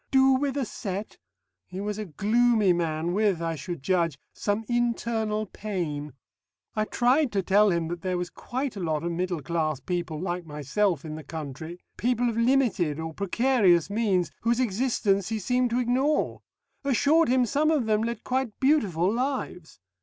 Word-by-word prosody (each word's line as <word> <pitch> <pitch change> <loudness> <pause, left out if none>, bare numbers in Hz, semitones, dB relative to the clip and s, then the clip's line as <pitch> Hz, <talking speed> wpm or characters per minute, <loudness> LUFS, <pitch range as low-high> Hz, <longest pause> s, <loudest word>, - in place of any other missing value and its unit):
Do 265 0 +5
with 275 +1 0
a 275 - 0
set! 200 -1 -5 0.5
He 185 - -7
was 210 +1 -3
a 215 - -3
gloomy 215 +3 +3
man 165 0 -1
with 200 -3 +2
(I 165 -1 -1
should 160 0 -6
judge) 170 -3 +1 0.2
some 205 +2 -1
internal 230 -3 0
pain. 165 -9 -4 0.6
I 215 0 +1
tried 255 +5 +2
to 195 -1 +1
tell 205 +3 +4
him 170 -3 0
that 175 0 -5
there 185 0 -1
was 175 0 -4
quite 260 -1 -4
a - - -5
lot 160 -3 -1
of 170 - -1
middle 175 -2 -2
class 155 -2 -1
people 170 +1 -3
like 175 0 -3
myself 155 +3 -1
in 155 - -5
the 155 0 -7
country, 160 +3 -7 0.2
people 245 0 +1
of 230 - -3
limited 230 - +2
or 160 0 -4
precarious 200 - +2
means, 195 -7 +1
whose 235 +1 +1
existence 210 -4 +1
he 225 - -1
seemed 250 +4 +1
to 240 +2 0
ignore; 260 +5 +1 0.4
assured 285 +4 +3
him 250 0 +4
some 290 +6 +1
of 300 -7 +2
them 215 -1 +2
led 230 -1 -3
quite 255 -4 -2
beautiful 205 - +2
lives. 250 - -3
205 Hz, 170 wpm, -26 LUFS, 170-240 Hz, 0.6 s, Do